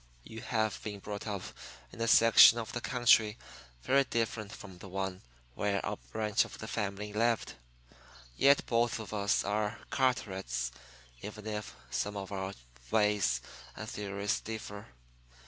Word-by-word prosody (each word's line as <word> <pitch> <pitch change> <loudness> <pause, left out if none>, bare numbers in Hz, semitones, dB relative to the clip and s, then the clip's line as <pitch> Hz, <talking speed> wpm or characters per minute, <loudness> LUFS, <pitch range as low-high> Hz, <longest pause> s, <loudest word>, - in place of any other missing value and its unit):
You 115 0 -9
have 110 -2 -1
been 105 -1 -5
brought 105 +2 -6
up 100 -3 -3 0.5
in 115 - -9
a 115 - +1
section 115 0 +8
of 115 -2 -4
the 120 - -3
country 120 -3 +4 0.5
very 140 +1 +4
different 115 -4 -2
from 95 -3 -11
the 100 - -10
one 95 0 -3 0.3
where 100 +3 -1
our - - -2
branch 105 - +2
of - - -10
the 110 - -7
family 105 -1 -3
lived. 115 +1 +1 0.8
Yet 140 - +5
both 115 0 +1
of 110 -1 -7
us 100 -1 +1
are 105 +1 -1
Carterets, 95 - 0 0.5
even 105 +1 -8
if 105 -1 -5 0.2
some 105 +11 -2
of 95 0 -6
our 95 0 -4 0.3
ways 105 - +2 0.3
and - - -7
theories 100 0 -2
differ. 105 -2 -7
105 Hz, 145 wpm, -32 LUFS, 100-115 Hz, 0.8 s, section